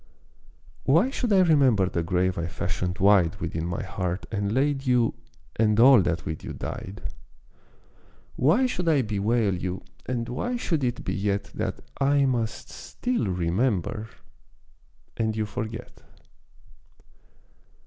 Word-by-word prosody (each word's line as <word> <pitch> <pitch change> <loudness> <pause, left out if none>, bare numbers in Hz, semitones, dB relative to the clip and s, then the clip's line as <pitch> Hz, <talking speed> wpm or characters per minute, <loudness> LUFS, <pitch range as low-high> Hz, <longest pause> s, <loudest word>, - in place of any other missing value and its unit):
Why 170 - +4
should 245 -4 -2
I 195 -2 +6
remember 135 - +4
the 85 - -1
grave 90 +2 0
I 85 0 -2
fashioned 90 0 -3
wide 95 -4 +4
Within 80 +1 -3
my 85 - -3
heart 90 -1 -3
and 100 -2 -1
laid 135 +2 0
you, 125 -2 +3 0.4
and 110 -1 +3
all 130 -1 +8
that 85 -2 -1
with 80 - -5
you - - -6
died. 95 +2 -6 1.3
Why 170 - +3
should 180 -9 -1
I 145 -5 +3
bewail 105 0 +1
you, 90 +1 -4 0.2
and 120 -2 -2
why 240 - -2
should 165 - -1
it 120 -1 -1
be - - -2
yet 100 0 -1
That - - -3 0.2
I 140 0 +3
must 120 -4 -2
still 245 - -3
remember 95 +4 -1 1.1
and 110 -1 0
you 110 - 0
forget! 110 +3 -6
110 Hz, 135 wpm, -26 LUFS, 95-135 Hz, 1.3 s, all